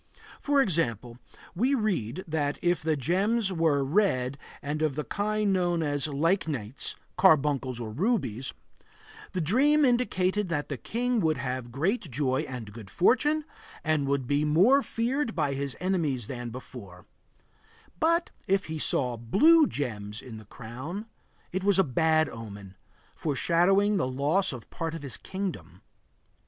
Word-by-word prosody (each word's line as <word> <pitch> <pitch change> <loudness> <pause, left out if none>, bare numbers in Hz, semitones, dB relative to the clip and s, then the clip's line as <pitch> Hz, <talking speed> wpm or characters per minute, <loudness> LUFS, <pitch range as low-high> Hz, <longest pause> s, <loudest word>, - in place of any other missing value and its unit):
For 285 -1 +3
example, 125 - -1 0.3
we 250 +10 +2
read 185 - -1
that 150 -2 -1
if 175 -2 +2
the 155 -1 0
gems 195 - +1
were 160 -5 +2
red 140 -6 +1 0.2
and 150 +2 -3
of 155 -4 +1
the 150 - -2
kind 210 +1 0
known 175 -3 +1
as 145 -1 -1
lychnites 145 - -1 0.2
(carbuncles 145 -8 +3
or 115 -2 -5
rubies), 135 - -1 0.8
the 185 - -1
dream 280 - +4
indicated 210 -6 +1
that 150 -3 -2
the 140 - -3
king 245 - -1
would 160 -5 +1
have 125 -1 -4
great 170 - -1
joy 135 +1 0
and 115 -5 -7
good 110 -4 -10
fortune 295 - +2 0.4
and 155 -3 +1
would 140 -2 0
be 145 +3 +1
more 185 - +5
feared 245 +1 -1
by 150 -4 0
his 140 -1 -3
enemies 165 - 0
than 120 0 -5
before; 110 -7 -10 0.9
but 335 +2 +2 0.2
if 195 +1 +2
he 160 0 -5
saw 125 -4 +1
blue 295 - +5
gems 105 -6 -4
in 115 -4 -9
the 110 - -14
crown, 130 - -7 0.5
it 185 +1 -2
was 200 -1 +3
a 190 - +6
bad 160 +2 +2
omen, 100 -5 -9 0.4
foreshadowing 180 +7 +2
the 165 - 0
loss 145 +9 +1
of 125 -4 -8
part 165 -1 -4
of 165 - -7
his 135 - -3
kingdom. 190 -1 -6
155 Hz, 145 wpm, -28 LUFS, 130-195 Hz, 0.9 s, a